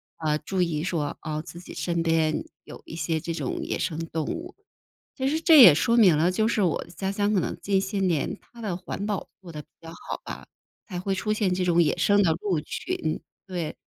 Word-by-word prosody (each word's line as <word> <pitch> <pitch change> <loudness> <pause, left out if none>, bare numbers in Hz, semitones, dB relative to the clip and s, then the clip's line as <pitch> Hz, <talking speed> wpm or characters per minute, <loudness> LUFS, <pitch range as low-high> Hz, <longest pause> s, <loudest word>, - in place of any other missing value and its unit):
啊， 155 -2 0
注 185 +5 -2
意 160 -3 0
说， 165 -5 -2
哦， 155 -1 -3
自 170 - -9
己 180 - -11
身 170 -1 -1
边 165 -1 +1 0.2
有 - - -11
一 - - -9
些 160 0 -1
这 165 +1 -4
种 165 - -3
野 - - -2
生 160 -3 -2
动 160 -1 -3
物。 345 - -5 0.6
其 265 -1 -2
实 310 +3 +1
这 320 -4 +8
也 180 -11 +10
说 230 +10 +2
明 185 -9 +6
了， 170 +4 +3
就 215 +4 +1
是 225 -2 +1
我 175 - +1
的 - - -18
家 190 +3 -3
乡 205 +1 0
可 200 - +3
能 - - -3
近 200 -1 +2
些 195 +1 -3
年 175 -6 0
它 235 - -15
的 205 -5 -2
环 185 +2 -5
保 205 -2 -3
做 175 -3 -10
得 150 -1 -7
比 - - -24
较 165 - -10
好 170 - -7
吧， - - -8 0.4
才 180 -5 -5
会 195 +2 -1
出 190 +3 -2
现 205 -4 +1
这 180 0 -1
种 170 -1 +4
野 150 - +1
生 205 +3 +4
的 170 - +3
鹿 185 -6 0
群， 155 +1 -3 0.2
对。 175 -5 -4
180 Hz, 250 characters per minute, -26 LUFS, 160-205 Hz, 0.6 s, 也